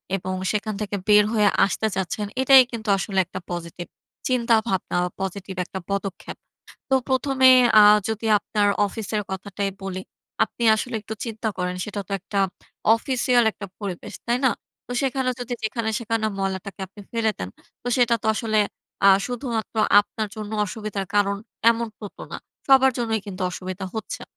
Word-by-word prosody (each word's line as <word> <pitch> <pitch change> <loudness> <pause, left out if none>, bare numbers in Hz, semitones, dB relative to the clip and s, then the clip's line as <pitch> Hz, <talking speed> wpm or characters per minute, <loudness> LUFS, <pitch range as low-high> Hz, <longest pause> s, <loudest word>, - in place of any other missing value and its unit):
এবং 185 0 -4 0.2
সেখান 215 0 -2
থেকে 205 -1 -3
বের 210 0 +7
হয়ে 210 -2 +4 0.2
আসতে 220 +2 -1
চাচ্ছেন, 190 +3 -2 0.2
এটাই 265 0 +8
কিন্তু 225 -3 -5
আসলে 195 0 -1
একটা 185 - -7
পজিটিভ 175 0 -6 0.4
চিন্তাভাবনা 230 -7 +1
বা, - - -3
পজিটিভ 195 0 -5
একটা 190 - -6
পদক্ষেপ। 200 -1 -4 0.5
তো 265 - +3
১ম 265 +1 0
এ - - +10 0.3
আ - - +9 0.3
যদি 220 0 -3
আপনার 205 0 0 0.2
অফিসের 215 0 -3
কথাটাই 195 +1 -3
বলি। 190 -1 -4 0.4
আপনি 235 - -10
আসলে 245 +3 -4
একটু 215 +1 -7
চিন্তা 220 -1 -3
করেন, 180 0 -2
সেটা 210 -1 -5
তো - - -6
একটা 200 +2 -4 0.6
অফিসিয়াল 245 0 +2
একটা 200 - -8
পরিবেশ। 195 -5 -6
তাই 240 +1 +1
না? 260 - +5 0.4
তো 245 - -6
সেখানে 265 -1 0
যদি 245 0 -3
যেখানে 220 +1 -2
সেখানে 225 -1 -1
ময়লাটাকে 195 0 -4
আপনি 205 +3 -15
ফেলে 225 -1 +1
দেন, 90 - -4 0.3
তো - - -12
সেটা 240 -2 +4
তো - - -3
আসলে 215 -1 0 0.5
আ - - +9 0.2
শুধুমাত্র 240 -3 -4 0.3
আপনার 215 +1 -5
জন্য 210 -1 -6 0.2
অসুবিধার 205 -1 -4
কারণ, 200 -1 +2 0.3
এমন 235 0 -1
ত - - -67 0.2
তো - - -8
না। - - -4 0.3
সবার 265 -1 +6
জন্যই 225 -2 0
কিন্তু 190 -1 -6
অসুবিধা 185 +1 -6
হচ্ছে। 220 -1 -5
215 Hz, 165 wpm, -23 LUFS, 195-235 Hz, 0.6 s, এ